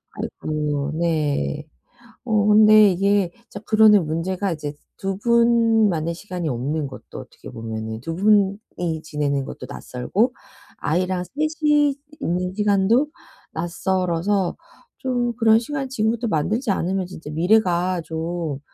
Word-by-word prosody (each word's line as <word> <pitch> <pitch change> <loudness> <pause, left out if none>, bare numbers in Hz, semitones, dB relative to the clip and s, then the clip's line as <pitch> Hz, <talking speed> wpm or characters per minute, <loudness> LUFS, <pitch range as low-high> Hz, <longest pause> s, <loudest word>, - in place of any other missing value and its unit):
아이고. 150 -2 -3
네. 150 -2 -1 0.6
어, 215 -3 +2
근데 215 -1 +7
이게 195 0 +2 0.2
진짜 205 - -8
그러는 215 -5 +5
문제가 180 +4 -2
이제 150 -2 -4 0.2
2 195 0 -3
분 230 -1 +4
만의 165 -2 -1
시간이 180 -2 -5
없는 140 +4 -2
것도 135 - -10
어떻게 - - -11
보면은 110 0 -5
2 165 +7 -5
분이 195 -4 +1
지내는 145 -3 -1
것도 125 - -8
낯설고 185 - -1 0.4
아이랑 180 +3 -1
3 - - -20 0.3
이 295 -2 +3 0.2
있는 180 +2 -2
시간도 210 +6 +2 0.4
낯설어서 180 +2 -1 0.4
좀 245 -2 -1
그런 225 -2 +5
시간 275 +3 -4
지금부터 230 -1 -1
만들지 210 - 0
않으면 190 0 -1
진짜 170 -4 -10
미래가 180 +1 +2
좀 160 -2 -4
185 Hz, 255 characters per minute, -22 LUFS, 160-215 Hz, 0.6 s, 근데